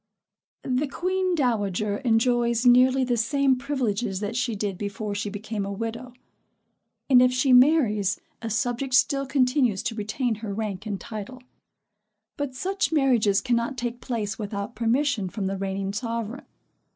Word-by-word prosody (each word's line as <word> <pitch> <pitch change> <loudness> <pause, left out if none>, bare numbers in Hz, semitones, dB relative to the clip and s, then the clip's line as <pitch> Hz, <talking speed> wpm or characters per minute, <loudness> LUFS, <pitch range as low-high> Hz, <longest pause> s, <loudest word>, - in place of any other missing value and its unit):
The 260 +3 0
queen 370 +5 -1
dowager 210 - 0
enjoys 235 0 +1
nearly 255 +2 +5
the 245 -1 0
same 270 +4 +2
privileges 245 -7 -2
that 210 +2 -4
she 245 -2 -1
did 200 -1 -2
before 205 +2 -4
she 205 +1 -3
became 210 0 -4
a 200 - -4
widow; 230 +4 -5 0.9
and 255 -2 +6
if 250 0 +5
she 255 +1 +2
marries 250 - +4 0.2
a 230 - -4
subject 245 +4 -1
still 275 +1 +2
continues 255 -6 +2
to 230 - -2
retain 220 +3 -2
her 205 -3 -4
rank 215 -1 -4
and 200 -2 -3
title; 230 +4 -8 0.9
but 285 -3 -4
such 385 +8 -1
marriages 240 -9 +3
cannot 240 +1 -1
take 240 0 -4
place 220 -4 -3
without 200 +1 -4
permission 230 -2 0
from 200 +1 -4
the 195 +1 -1
reigning 195 0 -3
sovereign. 230 +2 -4
235 Hz, 150 wpm, -25 LUFS, 205-255 Hz, 0.9 s, and